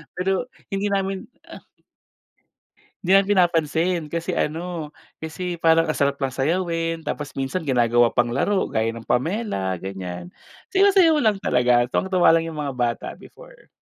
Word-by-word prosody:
pero 190 Hz, +5 st, -1 dB, 0.3 s
hindi 195 Hz, +1 st, -1 dB
namin, 195 Hz, -1 st, -2 dB, 0.2 s
ah. -, -, -10 dB, 1.4 s
Hindi 190 Hz, +2 st, +5 dB
na 195 Hz, -, +3 dB
pinapansin 170 Hz, -3 st, +1 dB
kasi 170 Hz, 0 st, -3 dB
ano, 160 Hz, -1 st, -3 dB, 0.2 s
kasi 175 Hz, +2 st, -5 dB
parang 165 Hz, 0 st, +3 dB
ang 155 Hz, -, -1 dB
sarap 140 Hz, 0 st, 0 dB
lang 135 Hz, -, 0 dB
sayawin, 165 Hz, +4 st, -1 dB
tapos 150 Hz, -2 st, -5 dB
minsan 135 Hz, +6 st, -3 dB
ginagawa 120 Hz, -3 st, +3 dB
pang 120 Hz, -, +2 dB
laro 190 Hz, +10 st, 0 dB
gaya 115 Hz, +1 st, -1 dB
ng 115 Hz, 0 st, -11 dB
Pamela 155 Hz, -, -1 dB
ganyan, 90 Hz, -2 st, -6 dB, 0.4 s
sayaw 395 Hz, 0 st, +4 dB
sayaw 330 Hz, -5 st, +5 dB
lang 215 Hz, -7 st, +1 dB
talaga 125 Hz, -1 st, +2 dB
tuwang 190 Hz, +8 st, -2 dB
tuwa 180 Hz, -1 st, +5 dB
lang 165 Hz, 0 st, +3 dB
yung 160 Hz, -2 st, -5 dB
mga 140 Hz, -3 st, -4 dB
bata 120 Hz, -1 st, -1 dB
before. -, -, -17 dB
165 Hz, 150 wpm, -22 LUFS, 130-190 Hz, 1.4 s, Hindi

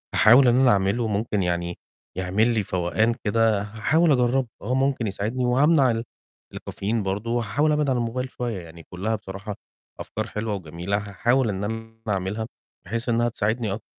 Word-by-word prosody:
هاحاول 125 Hz, +4 st, +7 dB
إن 120 Hz, -, +5 dB
أنا 130 Hz, -2 st, +5 dB
أعمله، 100 Hz, +4 st, +1 dB
ممكن 105 Hz, -1 st, -1 dB
يعني 85 Hz, 0 st, -2 dB, 0.4 s
يعمل 100 Hz, +6 st, +2 dB
لي 110 Hz, -3 st, +1 dB
فوقان 95 Hz, +6 st, +1 dB
كده، 110 Hz, -1 st, +2 dB
هاحاول 110 Hz, +11 st, +1 dB
أجرّبه، 125 Hz, -1 st, +2 dB
آه، 120 Hz, +5 st, -2 dB
ممكن 135 Hz, -3 st, +1 dB
يساعدني، 110 Hz, +6 st, -2 dB
وهامنع 135 Hz, +2 st, +4 dB
ال 115 Hz, 0 st, -2 dB, 0.5 s
الكافيين 105 Hz, +2 st, -3 dB
برضه، 100 Hz, +4 st, -2 dB
وهاحاول 120 Hz, +6 st, +1 dB
أبعِد 150 Hz, -1 st, +1 dB
عن 130 Hz, -, +2 dB
الموبايل 125 Hz, +2 st, -2 dB
شوية، 120 Hz, -6 st, -4 dB
يعني 85 Hz, 0 st, -12 dB
كُلّها 100 Hz, +7 st, -3 dB
بصراحة 100 Hz, 0 st, -7 dB, 0.4 s
أفكار -, -, -4 dB
حلوة، 105 Hz, 0 st, -3 dB
وجميلة، 90 Hz, +2 st, -3 dB
هاحاول 115 Hz, +5 st, +1 dB
إن 100 Hz, -1 st, -3 dB
أنا 115 Hz, +1 st, -5 dB
أعملها، 100 Hz, +3 st, -2 dB, 0.4 s
بحيث 115 Hz, +6 st, -3 dB
إنّها 120 Hz, +1 st, +2 dB
تساعدني 110 Hz, -1 st, -1 dB
أكتر، 110 Hz, -, -7 dB
110 Hz, 165 wpm, -24 LUFS, 100-120 Hz, 0.5 s, هاحاول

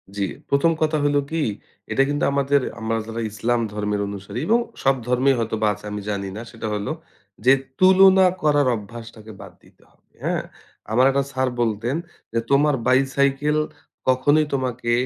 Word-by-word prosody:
জি। 100 Hz, -1 st, 0 dB, 0.2 s
১ম 140 Hz, +4 st, +3 dB
কথা 155 Hz, 0 st, +2 dB
হলো 145 Hz, 0 st, +3 dB
কি? 165 Hz, -2 st, 0 dB, 0.5 s
এটা -, -, +2 dB
কিন্তু 145 Hz, +1 st, -1 dB
আমাদের 140 Hz, 0 st, +2 dB, 0.2 s
আমরা 115 Hz, +1 st, -1 dB
যারা 115 Hz, +1 st, -4 dB
ইসলাম 115 Hz, +3 st, 0 dB
ধর্মের 105 Hz, -1 st, -2 dB
অনুসারী 100 Hz, +2 st, -6 dB
এবং 230 Hz, +2 st, +4 dB, 0.2 s
সব 135 Hz, 0 st, +4 dB
ধর্মেই 130 Hz, +2 st, +3 dB
হয়তোবা 110 Hz, -1 st, -1 dB
আছে 105 Hz, +1 st, -13 dB
আমি 105 Hz, -, -4 dB
জানি 100 Hz, -1 st, -3 dB
না। -, -, -5 dB
সেটা 110 Hz, -2 st, -6 dB
হলো 105 Hz, +4 st, -3 dB, 0.5 s
যে, 130 Hz, -, +7 dB, 0.3 s
তুলনা 190 Hz, 0 st, +6 dB, 0.2 s
করার 145 Hz, -3 st, +3 dB
অভ্যাসটাকে 110 Hz, 0 st, -10 dB
বাদ -, -, -11 dB
দিতে -, -, -23 dB
হবে। -, -, -36 dB
হ্যাঁ? -, -, -1 dB, 0.5 s
আমার 125 Hz, +4 st, +4 dB
একটা 140 Hz, 0 st, +1 dB
স্যার 130 Hz, -1 st, 0 dB
বলতেন 115 Hz, +4 st, -1 dB, 0.4 s
যে, 115 Hz, -, +1 dB
"তোমার 145 Hz, +1 st, +4 dB
বাই-সাইকেল 135 Hz, +3 st, +2 dB, 0.5 s
কখনোই 145 Hz, +4 st, +3 dB
তোমাকে 125 Hz, -3 st, -2 dB
130 Hz, 160 wpm, -22 LUFS, 110-145 Hz, 0.5 s, যে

